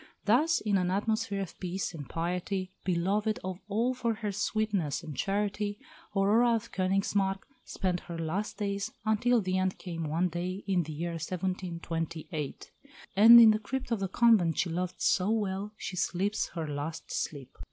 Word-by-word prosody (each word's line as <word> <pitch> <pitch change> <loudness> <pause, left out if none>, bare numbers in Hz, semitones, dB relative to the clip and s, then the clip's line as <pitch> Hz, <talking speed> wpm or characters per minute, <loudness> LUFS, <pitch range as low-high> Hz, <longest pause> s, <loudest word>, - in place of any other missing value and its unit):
Thus 295 +10 +3
in 205 -3 +2
an 180 -1 0
atmosphere 205 +1 0
of 190 - -7
peace 185 0 -3
and 145 -5 -8
piety, 180 +3 -2
beloved 200 +6 0
of 185 -1 -4
all 230 +5 +1
for 235 -3 -1
her 210 -1 -3
sweetness 205 -6 -1
and 150 - -7
charity, 205 +2 -1 0.4
Aurora 225 +5 +4
of 230 +1 -4
Königsmarck 195 +1 +1 0.2
spent 180 -2 -1
her 170 -1 -8
last 165 +8 -3
years 200 +1 -2
until 235 +2 +3
the 185 -1 0
end 185 0 0
came 165 -3 -5
one 165 +4 +1
day 180 +3 -4
in 190 -3 +2
the 155 -1 -6
year 170 +3 -3
1728; 165 -3 -4 0.4
and 225 +4 +10
in 225 -2 +9
the 215 - +1
crypt 260 +4 -4
of 230 - +1
the 195 - -1
convent 195 -6 +4
she 180 -4 0
loved 180 +2 -3
so 185 +2 +2
well 205 -2 -1
she 185 - -5
sleeps 190 +3 0
her 165 -2 -3
last 150 +2 -5
sleep. 140 -3 -4
190 Hz, 165 wpm, -30 LUFS, 175-210 Hz, 0.4 s, and